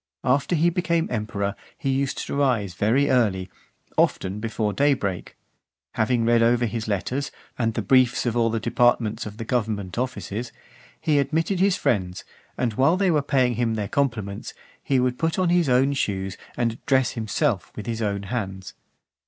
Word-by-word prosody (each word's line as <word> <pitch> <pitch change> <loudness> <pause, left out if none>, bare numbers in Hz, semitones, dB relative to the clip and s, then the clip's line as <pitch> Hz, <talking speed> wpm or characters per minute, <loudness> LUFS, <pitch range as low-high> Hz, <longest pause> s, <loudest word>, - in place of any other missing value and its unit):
After 140 +7 +2
he 170 +2 +3
became 170 -2 0
emperor, 105 -3 -2 0.2
he 135 -5 -1
used 135 0 -1
to - - -4
rise 120 -10 +1
very 115 +10 +2
early, 95 -7 +1 0.5
often 95 +2 +1
before 110 -1 -2
daybreak. 125 -10 0 0.6
Having 115 +1 +1
read 115 0 +4
over 120 +1 +3
his 115 0 -3
letters, 125 +7 -2 0.3
and 115 -2 -1
the - - -1
briefs 130 -2 +3
of 120 -1 0
all 115 -1 +3
the 115 0 -1
departments 120 -2 +1
of 105 0 -9
the 115 - -5
government 110 -5 -2
offices; 125 -2 -4 0.5
he 150 -2 +2
admitted 165 +6 0
his 195 0 +3
friends; 90 -5 -1 0.3
and 120 -3 0
while 140 - +3
they 190 -2 +2
were 150 -2 +3
paying 130 -4 +1
him 115 -2 0
their 105 -2 -2
compliments, 110 -7 -2 0.3
he 135 -2 +1
would 125 0 0
put 165 0 0
on 185 -2 +2
his 175 -4 +3
own 130 +3 +3
shoes, 95 -7 -2 0.2
and 115 -2 -1
dress 130 -3 +3
himself 115 - -1
with 105 - -6
his 115 -1 -3
own 100 -2 -1
hands. 95 -3 -4
120 Hz, 170 wpm, -24 LUFS, 105-135 Hz, 0.6 s, read